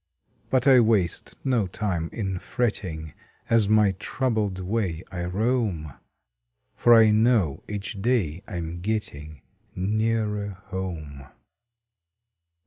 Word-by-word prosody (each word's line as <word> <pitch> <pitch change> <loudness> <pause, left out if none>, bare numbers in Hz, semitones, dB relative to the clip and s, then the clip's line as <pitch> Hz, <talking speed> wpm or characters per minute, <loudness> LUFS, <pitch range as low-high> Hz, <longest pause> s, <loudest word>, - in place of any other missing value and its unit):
But 130 -1 +2
I 135 -3 +7
waste 110 -7 +1
no 120 -7 +1
time 90 -4 -2
in 95 -5 -3
fretting 90 - -3 0.4
As 110 -3 +4
my 105 -2 +5
troubled 110 -6 -1
way 95 -3 -2
I 90 -2 -3
roam, 100 - -1 0.8
For 120 -1 +6
I 110 -1 +7
know 110 - +2
each 100 -1 -5
day 95 -9 0
I - - -7
m 85 0 -5
getting 80 - -4 0.3
Nearer 105 0 -1
home! 80 -7 -5
100 Hz, 110 wpm, -25 LUFS, 85-110 Hz, 0.8 s, I